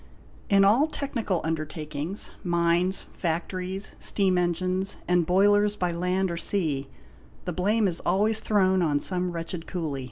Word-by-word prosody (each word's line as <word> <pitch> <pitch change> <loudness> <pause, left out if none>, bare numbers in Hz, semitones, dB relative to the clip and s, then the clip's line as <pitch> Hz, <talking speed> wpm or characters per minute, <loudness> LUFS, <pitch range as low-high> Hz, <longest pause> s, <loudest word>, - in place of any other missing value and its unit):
In 195 -1 +5
all 240 +10 +4
technical 235 - -2
undertakings, 155 +2 -3
mines, 175 +1 +1
factories, 185 +3 -3
steam 190 -3 +2
engines 185 +2 0
and 175 -2 +2
boilers 205 +3 +4
by 180 -3 -1
land 180 +2 0
or 170 - -4
sea, 155 -8 -1 0.6
the 180 - -3
blame 205 +5 +2
is 170 -3 -2
always 215 +3 +1
thrown 190 -4 +2
on 150 -4 +2
some 180 +2 0
wretched 165 0 -5
cooly. 160 -7 -3
180 Hz, 135 wpm, -26 LUFS, 170-195 Hz, 0.6 s, In